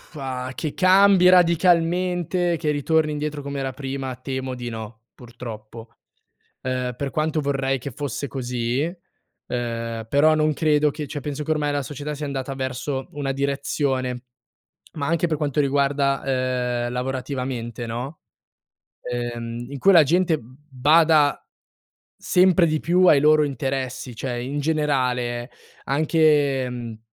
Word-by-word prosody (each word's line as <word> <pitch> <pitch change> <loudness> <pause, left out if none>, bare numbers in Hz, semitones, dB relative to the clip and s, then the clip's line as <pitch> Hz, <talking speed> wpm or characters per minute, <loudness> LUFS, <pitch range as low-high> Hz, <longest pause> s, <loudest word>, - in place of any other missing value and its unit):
Ah, 130 -2 -4
che 155 -3 -3
cambi 190 0 +6
radicalmente, 175 0 +3
che 155 -2 -1
ritorni 155 +1 +1
indietro 150 -1 -4
com'era 135 -2 -4
prima 135 -1 -5
temo 130 +1 -4
di 120 -1 -5
no, 110 0 -8
purtroppo. 115 -2 -10 0.7
Ehm, 125 -1 -2
per 140 +1 -3
quanto 155 +1 0
vorrei 135 -1 0
che 140 +3 -6
fosse 140 +1 -4
così, 125 -1 -2 0.7
ehm, 115 -2 -4
però 150 +5 +4
non 155 0 +2
credo 150 -1 +2
che 150 +1 -6
cioè 145 - -5
penso 145 +1 -4
che 160 - -5
ormai 150 -1 +1
la 145 0 -1
società 145 +2 -5
sia 150 +1 -5
andata 135 -1 -4
verso 130 +1 -3
una 145 -3 -2
direzione. 135 -2 -1 0.7
Ma 145 -3 -3
anche 170 +2 +1
per 160 -2 -1
quanto 145 -1 -1
riguarda, 140 -1 +1 0.6
ehm, 120 - -4
lavorativamente, 125 -2 -4
no, 125 +7 -5 0.8
ehm, 120 -1 -4
in 140 - -6
cui 195 - +4
la 165 -4 +8
gente, 170 +1 +2
mhmm, 125 +1 -16
bada 150 +3 +4 0.7
sempre 180 -1 +4
di 155 -1 +1
più 180 +3 +3
ai 150 - +7
loro 155 +1 +5
interessi. 130 -2 -3
Cioè 120 +1 -4
in 140 +4 -3
generale 130 -5 0 0.3
anche, 145 -3 +2
mhmm, 120 -3 -6
140 Hz, 135 wpm, -23 LUFS, 125-155 Hz, 0.8 s, la